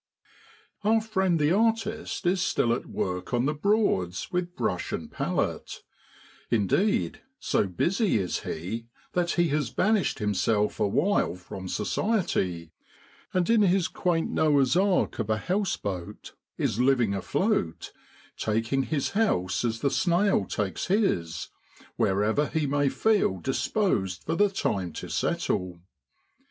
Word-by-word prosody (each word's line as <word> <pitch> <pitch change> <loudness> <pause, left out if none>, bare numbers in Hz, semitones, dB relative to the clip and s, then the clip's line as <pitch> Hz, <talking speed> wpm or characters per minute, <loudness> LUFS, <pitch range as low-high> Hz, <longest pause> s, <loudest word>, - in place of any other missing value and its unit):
Our 220 +2 +4
friend 190 -6 0
the 150 +1 +3
artist 220 +1 0
is 180 +1 +2
still 120 -9 +2
at 120 - -4
work 90 +6 -3
on 120 +1 +1
the 150 - +1
Broads 150 - 0
with 180 -1 -2
brush - - -2
and - - -5
palette; - - -2 0.7
indeed, 190 - +1 0.2
so 100 - 0
busy 175 - +1
is 95 -3 -1
he 110 +8 -5 0.3
that 175 -1 +1
he 175 -1 +2
has 145 -4 0
banished 205 - +1
himself 105 +1 0
awhile 110 - +1
from 95 +1 -8
society, 95 - -1 0.6
and 180 -2 +1
in 230 -1 +4
his 190 -2 +3
quaint 170 -3 -1
Noah's 145 -3 +3
ark 190 -5 +2
of 110 -1 -2
a 110 - +2
house 185 - -1
boat 90 -4 -6 0.2
is 110 - -1
living 125 -5 +3
afloat, 100 - -1 0.4
taking 115 +5 0
his 140 0 -1
house 95 - +1
as 115 -1 -1
the 140 - +1
snail 180 - +2
takes 100 -1 -3
his, 90 - 0 0.5
wherever 110 +9 +1
he 160 -2 -1
may 145 0 +1
feel 205 - +2
disposed 100 - -1
for 160 - -2
the 205 +4 +4
time 95 - -2
to - - -7
settle. 90 -1 -1
145 Hz, 135 wpm, -27 LUFS, -, 0.7 s, Our